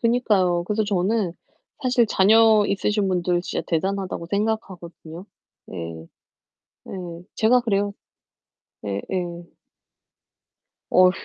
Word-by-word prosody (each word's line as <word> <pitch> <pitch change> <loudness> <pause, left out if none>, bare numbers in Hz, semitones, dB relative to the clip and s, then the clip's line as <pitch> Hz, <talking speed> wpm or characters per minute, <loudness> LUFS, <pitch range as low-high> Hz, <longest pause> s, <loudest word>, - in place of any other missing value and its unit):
그니까요. 210 -7 +2
그래서 210 +3 0
저는 200 -1 0 0.5
사실 250 -2 +3
자녀 215 +1 +5
있으신 200 0 0
분들 180 -1 +1
진짜 - - -3
대단하다고 190 +1 -2
생각하거든요. 190 -5 -4 0.5
예. 85 -3 -6 0.9
예. 175 -3 -7
제가 235 +3 +4
그래요. 205 -3 0 0.9
예, 100 -1 -2
예. 175 -2 -4 1.4
어휴. 185 0 +6
190 Hz, 225 characters per minute, -23 LUFS, 175-215 Hz, 1.4 s, 어휴